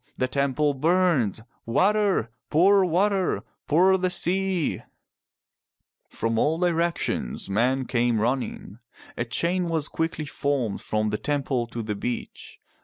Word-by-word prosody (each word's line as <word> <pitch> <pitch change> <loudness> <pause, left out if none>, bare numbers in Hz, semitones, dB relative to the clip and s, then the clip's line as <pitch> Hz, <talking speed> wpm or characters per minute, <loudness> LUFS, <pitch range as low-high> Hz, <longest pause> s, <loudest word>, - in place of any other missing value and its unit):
The 130 - +1
temple 140 +2 +1
burns. 150 - +1 0.2
Water! 190 - +2 0.2
Pour 195 +5 +5
water! 190 +2 +1 0.2
Pour 185 +5 +4
the 185 0 +1
sea! 185 -1 0 0.7
" - - -56
From 115 0 0
all 155 +5 +2
directions 170 - -1
men 125 +6 +1
came 120 -2 +1
running. 120 -3 -2 0.4
A 120 - -2
chain 170 +10 -1
was 160 -3 0
quickly 165 -1 -3
formed 140 -7 -2
from 110 0 -1
the 105 - -2
temple 135 -2 -1
to 115 0 -5
the 105 -1 -3
beach. 120 +4 -6
145 Hz, 125 wpm, -25 LUFS, 120-175 Hz, 0.7 s, Pour